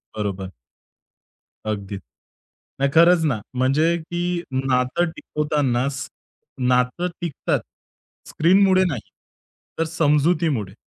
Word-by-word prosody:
बरोबर. 100 Hz, -3 st, -3 dB, 1.2 s
अगदीच. 100 Hz, -2 st, -4 dB, 0.8 s
नाही 140 Hz, 0 st, +2 dB
खरंच 170 Hz, 0 st, +6 dB
ना. 130 Hz, -8 st, 0 dB, 0.2 s
म्हणजे 140 Hz, +7 st, +2 dB
की 170 Hz, +1 st, -6 dB, 0.3 s
नातं 130 Hz, +5 st, +1 dB
टिकवताना 145 Hz, -4 st, -1 dB
स 140 Hz, -1 st, -5 dB, 0.6 s
नातं 125 Hz, +7 st, +1 dB
टिकतात 170 Hz, -5 st, -1 dB, 0.7 s
स्क्रीनमुळे 185 Hz, +3 st, +4 dB
नाही, 135 Hz, -10 st, -2 dB, 0.8 s
तर -, -, +3 dB
समजुतीमुळे. 150 Hz, -, +1 dB
145 Hz, 90 wpm, -22 LUFS, 125-170 Hz, 1.2 s, खरंच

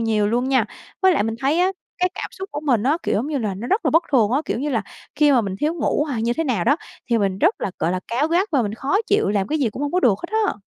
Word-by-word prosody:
nhiều 220 Hz, -2 st, +1 dB
luôn 245 Hz, +3 st, 0 dB
nha. 265 Hz, -1 st, +3 dB, 0.4 s
Với 375 Hz, -1 st, +6 dB
lại -, -, +2 dB
mình 225 Hz, +1 st, -2 dB
thấy 285 Hz, +5 st, +1 dB
á 370 Hz, +2 st, +2 dB, 0.3 s
cái 365 Hz, 0 st, +2 dB
cảm -, -, -5 dB
xúc 385 Hz, 0 st, -7 dB
của 295 Hz, -, -3 dB
mình 260 Hz, -8 st, +1 dB
á, 285 Hz, +7 st, +2 dB
kiểu -, -, 0 dB
giống 230 Hz, +6 st, 0 dB
như 295 Hz, -2 st, -1 dB
là, 215 Hz, -5 st, -2 dB
nó 205 Hz, +6 st, -6 dB
rất 420 Hz, +4 st, +1 dB
là -, -, +3 dB
bất 325 Hz, +2 st, +4 dB
thường 225 Hz, -5 st, +4 dB
á, 270 Hz, +4 st, +2 dB
kiểu -, -, -2 dB
như 290 Hz, +2 st, -2 dB
là, 225 Hz, -4 st, 0 dB, 0.3 s
khi 295 Hz, -1 st, +4 dB
mà 250 Hz, -, +5 dB
mình 195 Hz, -3 st, -3 dB
thiếu 310 Hz, +3 st, +1 dB
ngủ 295 Hz, -2 st, 0 dB
hay 260 Hz, -7 st, -3 dB
như 235 Hz, +1 st, +1 dB
thế 325 Hz, +6 st, -1 dB
nào 230 Hz, -, 0 dB
đó 285 Hz, +4 st, +4 dB, 0.3 s
thì 235 Hz, -, +3 dB
mình 195 Hz, -2 st, 0 dB
rất 355 Hz, -, +2 dB
là, 195 Hz, -, -2 dB
gọi 165 Hz, -, 0 dB
là, 185 Hz, -, -2 dB
cáu 270 Hz, +7 st, 0 dB
gắt 360 Hz, +5 st, +2 dB
và 265 Hz, -4 st, +3 dB
mình 210 Hz, 0 st, -3 dB
khó 275 Hz, +11 st, 0 dB
chịu, 415 Hz, +2 st, +2 dB
làm 200 Hz, -2 st, 0 dB
cái 310 Hz, -, 0 dB
gì 245 Hz, -6 st, +1 dB
cũng 265 Hz, -, -6 dB
hông 290 Hz, +2 st, -2 dB
có 365 Hz, -, +2 dB
được 230 Hz, -, +4 dB
hết 345 Hz, -, -5 dB, 0.2 s
á. -, -, 0 dB
265 Hz, 325 wpm, -21 LUFS, 220-310 Hz, 0.4 s, Với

